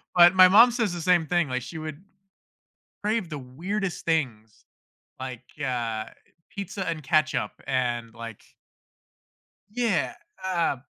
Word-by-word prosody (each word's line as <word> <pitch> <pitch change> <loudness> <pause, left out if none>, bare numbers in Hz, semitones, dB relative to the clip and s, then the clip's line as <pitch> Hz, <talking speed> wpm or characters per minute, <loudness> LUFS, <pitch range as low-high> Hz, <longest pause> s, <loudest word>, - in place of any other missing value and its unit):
But 175 +1 +8
my 185 -1 +9
mom 230 +5 +8
says 230 -5 0
the 175 - -4
same 175 -2 +3
thing, 175 -3 +2
like, 130 -1 -2
she 125 +6 -8
would 155 +2 -7 1.0
crave 210 -4 -1
the 150 -3 -5
weirdest 180 +10 -4
things, 120 -10 -2 0.5
like, 130 -2 -6 0.2
uh, 115 -4 -2 0.4
pizza 200 -1 -5
and 160 -3 -3
ketchup 155 +1 +1 0.2
and, 120 -3 -1
like 115 -2 -8 1.3
Yeah, 200 - 0 0.3
uh, 170 -7 0
160 Hz, 125 wpm, -26 LUFS, 125-185 Hz, 1.3 s, my